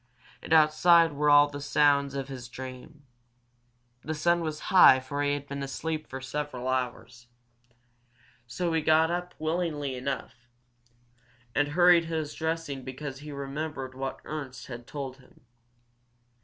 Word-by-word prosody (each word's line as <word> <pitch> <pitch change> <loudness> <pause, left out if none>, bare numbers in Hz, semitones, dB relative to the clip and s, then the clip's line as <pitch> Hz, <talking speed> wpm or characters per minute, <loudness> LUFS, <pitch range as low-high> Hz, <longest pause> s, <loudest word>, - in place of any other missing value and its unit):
And - - -10
outside 160 +1 +5
were 150 +1 +1
all 145 0 +7
the 145 0 -8
sounds 140 -1 +2
of 135 -1 -3
his 125 -3 -8
dream. 130 +4 -10 1.0
The 155 +2 -3
sun 170 +3 +2
was 155 -2 -4
high 135 -8 +8
for 140 +2 -4
he 145 0 +1
had 145 0 -7
been 140 0 -5
asleep 155 +3 -4
for 130 - -7
several 130 -1 -5
hours. 125 -1 -3 1.2
So 165 +8 -2
he 160 - +1
got 160 +1 +3
up 180 +1 -4
willingly 155 -3 -2
enough, 125 -1 -5 1.1
and 145 - +2
hurried 175 +2 +5
his 160 -2 -3
dressing 160 -4 -3
because 130 +1 -7
he 150 +1 -9
remembered 140 -1 -5
what 135 +1 -5
Ernst 135 -5 -6
had 120 -2 -9
told 135 -3 -6
him. 135 - -22
145 Hz, 140 wpm, -28 LUFS, 130-155 Hz, 1.2 s, high